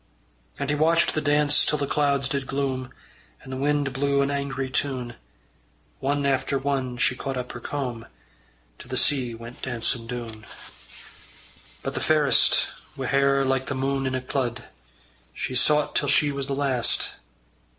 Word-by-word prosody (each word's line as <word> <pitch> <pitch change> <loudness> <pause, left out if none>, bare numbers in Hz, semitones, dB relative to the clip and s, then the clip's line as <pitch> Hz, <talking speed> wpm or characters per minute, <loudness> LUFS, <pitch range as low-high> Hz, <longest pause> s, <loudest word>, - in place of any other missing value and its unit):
And 140 - -2
he - - +1
watched 165 +3 +3
the 155 - -1
dance 145 0 +4
till 150 - +1
the 145 - -1
clouds 140 -1 +1
did 135 0 -3
gloom, 135 -2 -2 0.5
And 130 - -8
the - - -4
wind 145 0 0
blew 140 +1 +1
an 140 - -1
angry 140 -1 -2
tune: 130 -2 -2 0.9
One 140 +1 0
after 140 0 +1
one 135 -2 -2
she 130 - +2
caught 135 +1 -4
up 125 0 -4
her 120 - -7
comb, 120 -3 -4 0.7
To - - -11
the - - -2
sea 125 -5 +2
went 115 +2 -11
dancin' 120 -1 0
doon. 115 -3 -7 1.4
But - - -3
the - - -2
fairest, 150 -5 +4 0.3
wi' 135 - -3
hair 140 +1 +3
like 135 0 0
the 135 - -2
mune 135 0 -1
in 130 - -1
a 130 - -2
clud, 125 -2 -2 0.7
She - - -3
sought 150 +4 +3
till - - +2
she 150 -1 +4
was 140 -1 -3
the 140 - -2
last. 135 -4 +2
135 Hz, 165 wpm, -25 LUFS, 130-140 Hz, 1.4 s, dance